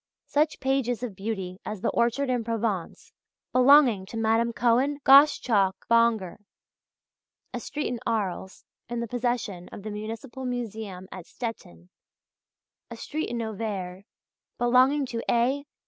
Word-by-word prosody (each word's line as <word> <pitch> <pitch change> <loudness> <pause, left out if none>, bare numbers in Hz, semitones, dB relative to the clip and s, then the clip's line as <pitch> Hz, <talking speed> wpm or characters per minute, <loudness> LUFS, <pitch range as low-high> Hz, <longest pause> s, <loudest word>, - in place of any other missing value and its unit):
Such 300 +1 0
pages 260 -3 0
of 225 -6 -5
beauty 195 -2 -5
as 210 -3 -6
the - - 0
"Orchard 240 +4 +1
in 245 -2 0
Provence," 220 -5 -3 0.4
belonging 255 -6 +5
to 225 - -7
Madame 225 +1 +2
Cohen 245 +5 +2
Gosschalk 255 -8 +5
Bonger, 230 -6 +3 1.2
"A - - -3
Street 295 0 -4
in 245 - -3
Arles," 195 -4 -3 0.2
in 240 0 -3
the 235 - -3
possession 240 -6 -3
of 200 - -9
the 215 - -5
Municipal 225 +5 -7
Museum 220 -7 -5
at 185 -2 -9
Stettin, 90 - -8 1.0
"A 235 - -8
Street 310 +7 -4
in 235 -1 -3
Auvers," 195 -4 -5 0.5
belonging 255 +4 +3
to 235 -2 -4
A. 265 +5 +1
230 Hz, 130 wpm, -26 LUFS, 205-250 Hz, 1.2 s, belonging